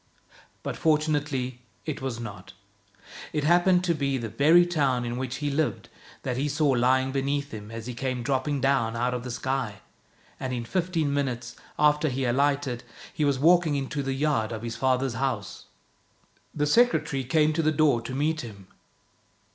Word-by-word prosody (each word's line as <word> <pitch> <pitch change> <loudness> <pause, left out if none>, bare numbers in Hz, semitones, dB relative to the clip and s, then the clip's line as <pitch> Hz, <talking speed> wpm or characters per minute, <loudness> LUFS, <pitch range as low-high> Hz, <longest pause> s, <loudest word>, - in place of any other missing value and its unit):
But - - -3
fortunately 150 -5 0 0.2
it 155 -3 -4
was 130 -3 -3
not. 100 -5 -8 0.8
It 150 - 0
happened 175 +3 +4
to 175 -2 +2
be 140 -3 -1
the 115 -3 -4
very 155 +10 +5
town 140 -8 +1
in 120 0 -3
which 130 0 -3
he 145 0 -2
lived 150 +1 -1 0.3
that 125 -2 -2
he 145 +3 0
saw 145 +1 +1
lying 130 +1 +3
beneath 140 +1 -1
him 105 -1 -8
as 115 0 -7
he 125 - -5
came 130 0 -3
dropping 135 +2 0
down 135 -5 +2
out 120 +2 0
of 125 -1 -3
the 125 - -6
sky; 125 -2 -2 0.6
and 130 -1 -3
in 120 -2 -3
fifteen 165 -3 0
minutes 125 -3 -2 0.2
after 150 +1 +3
he 135 0 -2
alighted, 135 0 +1 0.3
he 155 - -1
was 140 -2 +2
walking 165 +1 +4
into 140 +1 -2
the 135 -1 -2
yard 135 -6 0
of 110 0 -5
his 115 -1 -4
father's 130 +1 +1
house. 120 -7 -3 0.9
The 150 - -1
secretary 160 - +2
came 155 +4 +2
to 165 - +1
the 155 0 +2
door 145 -6 +3
to 125 +3 -6
meet 155 +3 0
him. 100 -5 -11
135 Hz, 175 wpm, -26 LUFS, 125-150 Hz, 0.9 s, very